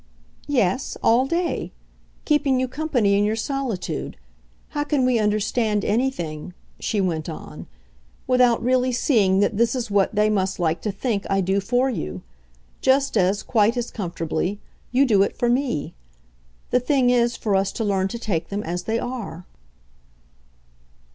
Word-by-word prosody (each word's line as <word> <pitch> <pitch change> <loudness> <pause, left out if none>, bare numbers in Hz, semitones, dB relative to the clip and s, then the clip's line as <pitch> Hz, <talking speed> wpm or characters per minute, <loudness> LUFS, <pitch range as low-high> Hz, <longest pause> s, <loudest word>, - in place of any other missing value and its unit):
"Yes 255 -4 0
all 245 +4 +4
day. 340 +3 -1 0.5
Keeping 290 -4 +2
you 260 - 0
company 255 -7 +1
in - - +3
your 210 +1 +1
solitude. 255 -4 -3 0.5
How 290 -1 -2
can 290 -3 +1
we 250 -2 +3
understand 210 0 0
anything," 180 -9 -2 0.2
she 215 - -1
went 170 -4 -1
on, 160 - -9 0.6
"without 250 -2 +3
really 255 +1 +2
seeing 210 -7 +2
that 205 0 +1
this 235 +2 +2
is 240 -4 -3
what 200 +1 +2
they 210 +1 +3
must 190 -3 0
like 165 -1 0
to 210 - -2
think 200 0 -2
I 195 - +2
do 190 +1 +1
for 245 +6 +1
you? 210 - -4 0.6
just 275 0 +2
as, 195 0 +2
quite 225 +1 +2
as 240 -1 -3
comfortably, 175 0 -3 0.3
you 265 +3 +4
do 210 -6 +4
it 200 - 0
for 240 - +1
me. 245 - -1 0.8
The 250 - +4
thing 250 -1 +2
is 240 -1 +2
for 205 -3 0
us 195 0 +1
to 225 - -3
learn 195 -2 +1
to 235 - -5
take 190 -8 -2
them 205 +1 -3
as 175 +2 -3
they 225 +1 0
are." 230 -9 -5
225 Hz, 160 wpm, -23 LUFS, 195-255 Hz, 0.8 s, all